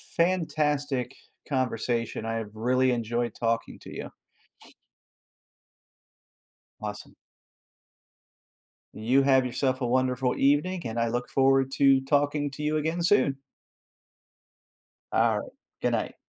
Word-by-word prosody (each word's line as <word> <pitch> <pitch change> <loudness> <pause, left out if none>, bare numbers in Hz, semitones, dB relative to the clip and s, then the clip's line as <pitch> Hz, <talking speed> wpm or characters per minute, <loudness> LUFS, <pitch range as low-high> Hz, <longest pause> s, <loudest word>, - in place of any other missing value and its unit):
fantastic 150 -7 0 0.3
conversation, 120 -4 -1
I 115 0 -2
have 110 -2 -4
really 130 +3 +2
enjoyed 120 0 -1
talking 115 0 -2
to - - -11
you. - - -6 2.7
Awesome. - - -7 1.8
You 125 +6 +2
have 130 -1 +4
yourself 130 +1 -1
a 125 - 0
wonderful 130 0 +1
evening, 150 +6 +2
and 115 0 -4
I 115 - +2
look 120 +2 -2
forward 135 0 +3
to 135 -1 +5
talking 145 +1 +1
to 150 +2 -7
you 155 +1 +1
again 160 +3 -1
soon. 170 -7 +3 1.7
Alright, - - +1 0.3
good - - +2
night. - - -2
130 Hz, 105 wpm, -27 LUFS, 120-145 Hz, 2.7 s, to